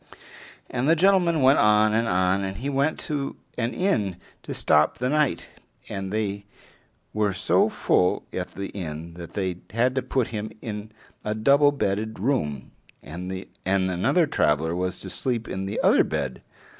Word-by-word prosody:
And 125 +4 -1
the 165 - +6
gentleman 175 -4 +3
went 135 +2 +6
on 105 -1 +4
and 115 +1 +2
on, 90 +1 +2
and 95 0 -4
he 140 +5 -3
went 140 +3 +1
to 140 -2 -3 0.2
an 120 0 -1
inn 140 - 0 0.3
to - - -8
stop 75 0 +2
the 125 +1 -1
night, 150 -1 +1 0.4
and 95 -1 -4
they 100 -2 -2 0.7
were 105 -2 +1
so - - +3
full 90 - +1
at - - -5
the 100 0 -4
inn 85 -3 -6
that 85 -1 -10
they 95 -3 -2
had 120 +5 +1
to 130 - 0
put 130 -3 -1
him 110 -1 -4
in 105 -1 -6 0.3
a 105 0 -2
double 140 +6 +5
bedded 110 -4 -2
room, 95 - -1 0.3
and 90 +5 -6 0.4
another 95 - +2
traveler 80 - +1
was 90 +1 -2
to 95 - -7
sleep 120 -3 -2
in 95 +1 -4
the 100 - -3
other - - +5
bed. 65 -3 -3
105 Hz, 165 wpm, -25 LUFS, 95-130 Hz, 0.7 s, the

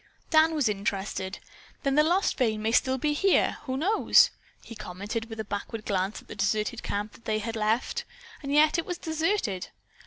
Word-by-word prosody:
Dan 315 0 +5
was 290 -6 +2
interested. 195 -2 -2 0.5
"Then 275 -2 +1
the 300 - +5
lost 350 +6 +2
vein 220 -5 0
may 220 - +1
still 260 +2 +3
be 295 +3 0
here, 390 +6 +2
who 260 -1 -2
knows?" 395 +10 +5 0.3
he - - -10
commented 210 +2 -5
with 225 0 -8
a 220 - -3
backward 205 +2 -5
glance 195 0 -1
at - - -27
the - - -8
deserted 210 +4 -1
camp 210 +3 -4
they 215 -1 0
had 225 +2 -4
left. 220 +2 0 0.4
And 280 -1 -5
yet, 310 +3 +4
was 355 0 -4
it - - -30
deserted? 320 - -1
230 Hz, 185 wpm, -27 LUFS, 210-300 Hz, 0.5 s, Dan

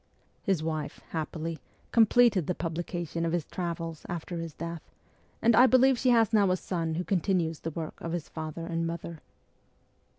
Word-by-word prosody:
His 190 -7 0
wife, 155 -2 -3
happily, 160 0 -4 0.3
com 225 -2 +6
pleted 220 - +4
the 180 - 0
publication 170 0 -3
of 165 0 0
his 170 -4 0
' - - -32
Travels 165 -3 -3
' - - -20
after 175 0 -4
his 165 -2 -6
death, 170 0 -5 0.6
and 230 0 +5
I 250 +3 +8
believe 255 0 +5
she 255 - +2
has 230 -2 +4
now 205 -3 +5
a 185 - +2
son 165 -3 -2
who 175 - -1
continues 175 -4 0
the 165 - -4
work 160 0 -6
of 165 - -4
his 170 -3 -3
father 160 +1 -6
and 165 -1 -1
mother. 165 -1 -5
170 Hz, 190 wpm, -29 LUFS, 165-190 Hz, 0.6 s, I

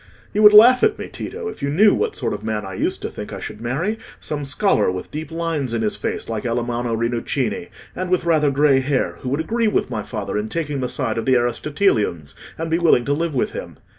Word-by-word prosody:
You 210 - +1
would 210 -1 +9
laugh 240 +4 +8
at 435 - +3
me, - - -7
Tito, 460 -1 -6
if - - -7
you 140 - -1
knew 200 +8 +5
what 445 -1 -1
sort - - -2
of - - -6
man 110 -2 -2
I 95 - -7
used - - -2
to - - -1
think - - -8
I - - -6
should 105 - -8
marry—some 150 - -4
scholar 140 - +2
with 90 0 -6
deep 155 0 -5
lines 160 -7 -2
in 115 - -1
his 105 - 0
face, - - -3
like 110 -2 -3
Alamanno 120 0 -1
Rinuccini, 125 - -2 0.3
and 185 0 -3
with 180 -1 +1
rather 155 -3 +3
grey 140 -1 +4
hair, 135 0 -1
who 125 - -4
would 140 +3 -1
agree 225 +8 0
with 210 - 0
my - - -2
father - - -4
in 105 +1 -4
taking 150 -2 -3
the 125 -1 -2
side 115 -4 -1
of 115 - -5
the 130 - +5
Aristotelians, 120 - 0 0.2
and 165 - -3
be 165 - +2
willing 160 -8 +4
to 145 - +1
live 165 0 -2
with 125 - 0
him. - - -7
145 Hz, 235 wpm, -21 LUFS, 120-170 Hz, 0.3 s, would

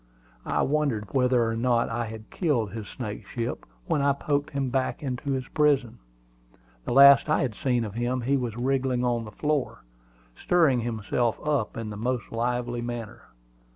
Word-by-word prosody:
I - - +1
wondered 140 -8 -1
whether 125 -3 +3
or 115 - -1
not 120 0 +2
I 115 0 -2
had 110 0 -10
killed 125 - 0
his 110 -2 -6
snakeship 115 +1 -5 0.2
when 145 - 0
I 140 0 +3
poked 145 +1 -1
him 140 -3 -2
back 135 +3 -1
into 135 +1 -2
his 130 -1 -3
prison. 145 -6 +1 0.9
The - - -3
last 140 +3 +8
I 155 - +2
had 125 -4 -2
seen 120 +1 0
of 105 - -7
him 120 +2 -1
he 135 +4 +1
was 120 -4 -2
wriggling 130 0 0
on 120 -2 0
the 105 - -9
floor, 145 - -2 0.5
stirring 160 -8 +3
himself 115 0 -1
up 140 -7 0
in 110 -2 -4
the 105 - -6
most 125 +2 -2
lively 120 +1 -1
manner. 120 -2 -6
125 Hz, 170 wpm, -26 LUFS, 115-135 Hz, 0.9 s, last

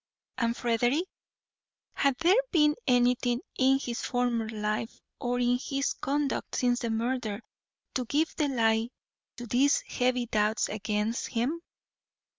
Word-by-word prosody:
] - - -55
And 235 -1 0
Frederick? 240 +7 +1 0.9
Had 275 -2 +1
there 365 +8 +5
been 300 -4 +4
anything 245 -1 +3 0.2
in 265 +1 +5
his 240 -3 -4
former 245 -3 0
life 215 +1 -3 0.2
or 245 0 -1
in 245 0 +2
his 275 +1 -1
conduct 285 +1 -2
since 245 -1 +2
the 235 - -2
murder 225 -2 -1 0.5
to 255 - -1
give 300 +7 0
the 300 - +1
lie 225 -3 +2 0.5
to 240 - -6
these 260 +5 +3
heavy 250 -1 0
doubts 215 -1 +1
against 215 +2 -2
him? 260 +9 -1
245 Hz, 135 wpm, -29 LUFS, 230-270 Hz, 0.9 s, there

